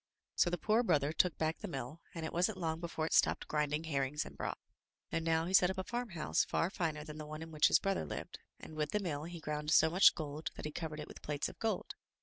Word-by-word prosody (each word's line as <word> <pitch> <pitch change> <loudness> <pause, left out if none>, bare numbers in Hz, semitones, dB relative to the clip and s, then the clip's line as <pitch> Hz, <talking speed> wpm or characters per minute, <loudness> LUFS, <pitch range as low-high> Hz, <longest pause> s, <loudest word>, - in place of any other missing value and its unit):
So 175 - +3
the 175 - -1
poor 215 +7 +3
brother 155 - +2
took 175 +2 +2
back 160 0 0
the 210 - -5
mill, 135 0 -6
and 165 -1 -3
it - - -5
wasn't 180 +4 +1
long 160 -3 -2
before 165 -2 -2
it - - -2
stopped - - +3
grinding 150 0 0
herrings 145 -1 -1
and - - -10
broth. - - -3 0.5
And 165 - 0
now 165 0 +2
he 185 - -3
set 180 -1 +7
up 190 - -3
a 190 - -1
farmhouse 235 -8 -1
far 170 - 0
finer 160 -6 -2
than 155 0 -8
the 155 - -6
one 155 +1 -6
in 165 - -10
which 155 -1 +5
his - - +6
brother 195 - 0
lived, 75 - -6 0.2
and - - -10
with 150 -1 -2
the 210 - +2
mill 155 -6 -3
he 170 0 -7
ground 150 -1 -3
so 160 +1 +6
much 185 +4 +7
gold 150 0 -4
that - - -7
he 150 - -3
covered 155 -1 -5
it 150 - -6
with - - -11
plates 145 -1 -2
of - - -13
gold. 225 -1 -1
160 Hz, 260 wpm, -35 LUFS, 150-175 Hz, 0.5 s, set